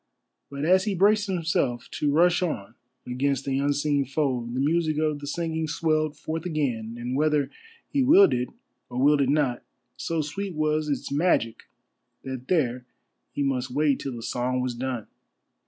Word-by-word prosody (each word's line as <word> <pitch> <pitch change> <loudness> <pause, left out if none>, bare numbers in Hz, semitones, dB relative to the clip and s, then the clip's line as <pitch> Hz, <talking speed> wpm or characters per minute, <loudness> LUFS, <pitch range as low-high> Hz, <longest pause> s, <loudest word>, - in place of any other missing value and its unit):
But 140 +1 -4
as 185 +3 +4
he 205 -3 0
braced 205 +3 +3
himself 165 -10 -1
to 145 - 0
rush 175 +4 +4
on 115 - -3 0.3
against 135 +2 -1
the 135 0 0
unseen 145 0 +1
foe 130 -3 -1
the 125 - -2
music 155 +2 +1
of 155 -1 0
the 145 - -7
singing 160 +1 -2
swelled 155 -1 0
forth 160 +1 -4
again, 125 -9 -2
and 120 +2 -3
whether 150 -1 +1 0.4
he 280 - 0
willed 330 +10 +6
it 125 0 -1 0.4
or 125 0 -4
willed 145 +2 +4
it 135 - +2
not, 140 -4 +1 0.4
so 165 -1 -1
sweet 185 +5 -4
was 155 0 0
its 140 - -2
magic 140 -7 +1 0.6
that 130 -1 -6
there 125 -8 0 0.4
he 145 - -2
must 130 -2 -1
wait 145 +2 +1
till 135 -3 -5
the 115 - -7
song 125 +2 -1
was 125 -1 -1
done. 125 -2 -3
145 Hz, 170 wpm, -26 LUFS, 130-160 Hz, 0.6 s, willed